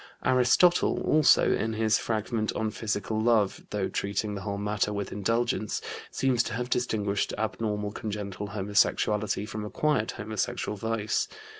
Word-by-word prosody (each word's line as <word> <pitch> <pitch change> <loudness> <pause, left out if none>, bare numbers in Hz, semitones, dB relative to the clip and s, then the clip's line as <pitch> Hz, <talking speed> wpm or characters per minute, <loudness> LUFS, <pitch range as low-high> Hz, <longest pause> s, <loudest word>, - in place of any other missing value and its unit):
Aristotle 130 +8 +4
also, 155 -1 +5
in 110 0 -1
his 110 0 +2
fragment 110 0 -1
on 110 -1 -1
physical 110 0 -2
love, 110 -4 +2
though 100 -2 -1
treating 100 +1 -2
the 100 - -5
whole 100 0 -3
matter 105 0 0
with 100 -1 -3
indulgence, 115 +1 0 0.3
seems 130 -3 +1
to 120 - -3
have 125 +2 -3
distinguished 105 -5 0
abnormal 105 -1 -2
congenital 105 -2 -5
homosexuality 105 +1 +1
from 110 0 -5
acquired 110 +2 0
homosexual 105 0 -3
vice. 110 0 -1
105 Hz, 135 wpm, -28 LUFS, 105-115 Hz, 0.3 s, also